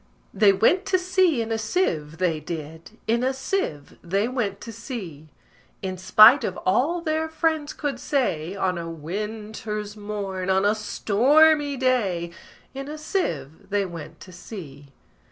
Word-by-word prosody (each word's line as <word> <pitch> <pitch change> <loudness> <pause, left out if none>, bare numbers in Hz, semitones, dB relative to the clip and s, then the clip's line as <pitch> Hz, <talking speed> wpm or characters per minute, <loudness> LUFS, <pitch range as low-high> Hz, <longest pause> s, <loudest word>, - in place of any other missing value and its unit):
They 205 0 +5
went 325 - +2
to 370 - +3
sea 365 -8 +2
in 225 - -6
a 225 - 0
sieve, 170 - -1
they 175 -4 0
did; 160 +5 -8
In 235 +2 +1
a 260 +1 0
sieve 265 - -3
they 195 +5 0
went 225 -6 -2
to 230 - -7
sea: 190 - -8 0.5
In 190 -1 -3
spite 215 +7 +7
of 185 - -3
all 280 - +2
their 315 0 -1
friends 315 -2 0
could 280 -5 -4
say, 195 - -1
On 185 -3 -1
a 165 0 -5
winter's 210 +5 -5
morn, 200 -3 -4
on 190 +1 +3
a 205 - +4
stormy 285 +8 +3
day, 205 -10 0 0.4
In 270 +1 -6
a 305 +1 -6
sieve 160 - -3
they 200 -1 +1
went 165 -4 -9
to 185 - -11
sea. 160 -6 -10
210 Hz, 155 wpm, -24 LUFS, 180-270 Hz, 0.5 s, spite